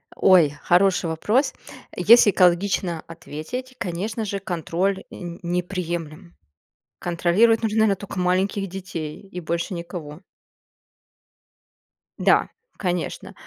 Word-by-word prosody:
Ой, 180 -6 +5
хороший 180 0 +3
вопрос. 230 - +1 0.4
Если 210 +3 +6
экологично 180 -2 +2
ответить, 170 - -7
конечно 205 +5 -3
же, 200 -1 -3
контроль 185 +2 -2
н 175 -1 -8
не 175 +1 0
неприемлем. 175 -1 -5 0.6
Контролировать 180 +7 +2
нужно, 220 0 +2
на 200 -2 +2
только 200 -1 -8
маленьких 185 +2 +1
детей 175 -5 -6
и 190 -2 -8
больше 170 +3 -3
никого. 170 -3 -7 2.0
Да, - - +3 0.3
конечно. 180 -3 -3
180 Hz, 100 wpm, -23 LUFS, 170-200 Hz, 2.0 s, Если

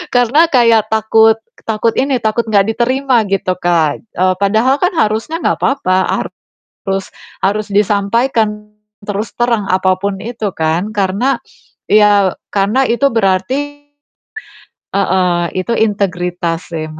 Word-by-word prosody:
Karena 250 +7 +4
kayak 230 -4 +4
takut 220 0 +4 0.3
takut 220 +1 0
ini 270 -1 +1
takut 220 +2 0
nggak 200 -1 +3
diterima 255 -1 +1
gitu 190 -2 0
Kak, 165 -4 +1
eee, 185 -4 -1
padahal 220 +7 +2
kan 360 - +3
harusnya 220 +9 0
nggak - - +1
apa-apa 225 -10 +1 0.9
harus 195 0 -1 0.4
harus 210 +2 0
disampaikan, 210 +1 0 0.4
terus 205 +2 -4
terang 235 -4 +1
apa 185 0 +2
pun 200 -1 -2
itu 220 -3 -4
kan 165 +6 -1
karena 205 +7 0 0.5
ya 205 -2 +4 0.2
karena 210 +7 +2
itu 260 +4 +2
berarti, 260 +9 -1 1.1
heeh, 185 -3 +1 0.2
itu 185 +5 -1
integritas 180 -5 -1
sih 160 -1 -3
210 Hz, 120 wpm, -15 LUFS, 190-235 Hz, 1.1 s, Karena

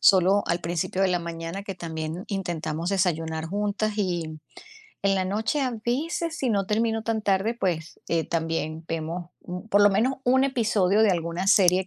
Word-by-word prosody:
solo 190 +2 +5
al 170 0 0
principio 175 +2 -1
de 190 - +4
la 180 -1 +2
mañana 170 +3 -5
que 195 - -5
también 160 0 -5
intentamos 170 -4 -2
desayunar 165 -4 0
juntas. 205 +3 -1
Y 170 -5 -1 0.6
en 195 0 +3
la 190 - +1
noche 215 +9 0
a 260 -2 +1
veces, 325 +6 -1
si 260 - 0
no 200 -3 +1
termino 225 +1 +1
tan 220 -1 -1
tarde, 200 +3 +1
pues, 170 -5 -2
eh, 165 -1 +1
también 165 -1 -2
vemos 165 +2 -4 0.4
por 205 +1 +5
lo 205 - +7
menos, 235 +7 +2
un 260 +1 +4
episodio 220 -6 +2
de 215 - +5
alguna 170 +1 -1
serie 185 -2 +5
190 Hz, 170 wpm, -26 LUFS, 170-210 Hz, 0.6 s, lo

